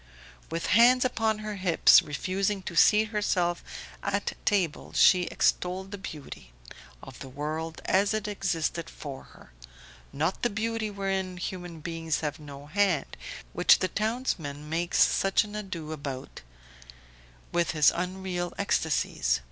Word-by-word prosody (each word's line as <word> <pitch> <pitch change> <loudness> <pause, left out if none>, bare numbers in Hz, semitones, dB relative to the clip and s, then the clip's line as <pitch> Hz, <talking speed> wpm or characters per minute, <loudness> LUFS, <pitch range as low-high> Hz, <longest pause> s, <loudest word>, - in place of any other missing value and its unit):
With 165 +1 -3
hands 245 +4 +6
upon 225 -3 +1
her 210 -1 -4
hips, 185 -3 +6
refusing 190 +7 -2
to 170 - -6
seat 215 +4 +5
herself 180 -5 0 0.4
at 200 0 -1
table, 185 -7 0
she 180 -2 +5
extolled 185 +3 0
the 205 - -6
beauty 145 - -9 0.5
Of 130 - -11
the 135 - -8
world 155 +4 -5
as 200 +2 +3
it 215 -1 -2
existed 175 -5 -2
for 140 -4 -8
her: - - -18 0.6
not 160 +6 -1
the 240 - +2
beauty 225 +1 -2
wherein 195 -2 -2
human 175 -2 -6
beings 165 -1 -2
have 150 0 -3
no 145 -1 -10
hand, 175 -2 0 0.4
which - - +6
the 185 - -1
townsman 195 - -2
makes 170 +2 -1
such 195 0 +2
an 210 0 -9
ado 175 -7 -5
about 140 -4 -6 1.1
with 170 -1 +1
his 155 -2 +5
unreal 180 0 -3
ecstasies. - - 0
180 Hz, 135 wpm, -28 LUFS, 155-205 Hz, 1.1 s, hands